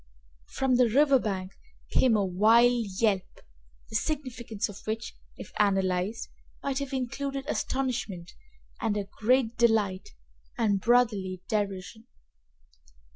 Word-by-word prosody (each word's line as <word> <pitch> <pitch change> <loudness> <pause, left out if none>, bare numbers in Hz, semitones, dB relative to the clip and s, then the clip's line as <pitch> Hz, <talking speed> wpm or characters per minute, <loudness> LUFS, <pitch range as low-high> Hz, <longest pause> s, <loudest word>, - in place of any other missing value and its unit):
From 265 -2 +1
the 245 -2 +4
river 275 +3 +4
bank 190 -4 -3 0.4
came 250 -4 +4
a 205 -2 +2
wild 225 +5 +4
yelp, 200 -5 0 0.5
the - - -7
significance 240 -5 -2
of 205 -1 -10
which, 225 +2 -3 0.2
if - - -10
analyzed, 195 +1 +1 0.4
might 275 -1 -1
have 280 -1 -5
included 270 +1 -3
astonishment 240 - -2 0.5
and 220 -3 0 0.2
great 235 +1 +2
delight 215 -5 +2 0.5
and 205 -4 +1
brotherly 210 -6 +2
derision. 205 +2 -3
225 Hz, 110 wpm, -28 LUFS, 200-250 Hz, 0.5 s, the